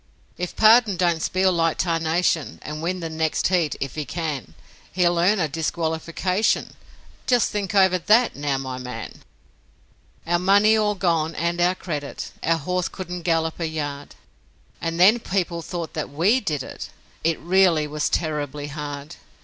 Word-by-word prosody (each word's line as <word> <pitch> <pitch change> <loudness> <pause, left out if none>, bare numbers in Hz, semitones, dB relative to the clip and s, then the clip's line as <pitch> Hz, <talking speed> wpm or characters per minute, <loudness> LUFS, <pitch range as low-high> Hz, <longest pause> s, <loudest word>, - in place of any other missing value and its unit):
If 180 0 -5
Pardon 220 -3 +5
don't 170 -2 +1
spiel 185 +2 +2
like 165 -2 +1
tarnation 165 -2 0
And 150 +1 -6
win 180 +2 -2
the 165 - -3
next 160 +1 0
heat 175 -5 +1
if 135 -2 -4
he 155 - -3
can 145 - -4 0.4
He'll 175 -1 +2
earn 195 +5 +3
a 170 -4 +1
disqualification; 165 +5 -1 0.5
Just 245 -3 +3
think 205 -1 -3
over 190 -2 +4
THAT, 225 +7 +3
now, 140 -1 -1
my 130 -1 -5
man!' 125 0 -7 1.0
Our 175 +1 +1
money 200 +4 +5
all 210 -1 +1
gone 165 -4 0
and 170 +1 -1
our 180 +1 +3
credit, 150 -6 -5
Our 165 0 +2
horse 180 +3 -1
couldn't 180 -1 -6
gallop 165 -1 0
a 165 - -1
yard; 145 -2 -5 0.7
And 165 0 -3
then 205 +7 +6
people 180 -5 -2
thought 170 0 -5
that 155 - -4
WE 175 - +2
did 150 - -2
it! - - -8 0.3
It 165 0 +1
really 175 -3 +3
was 150 0 -2
terribly 150 -3 -2
hard. 145 +1 -7
170 Hz, 155 wpm, -23 LUFS, 155-185 Hz, 1.0 s, then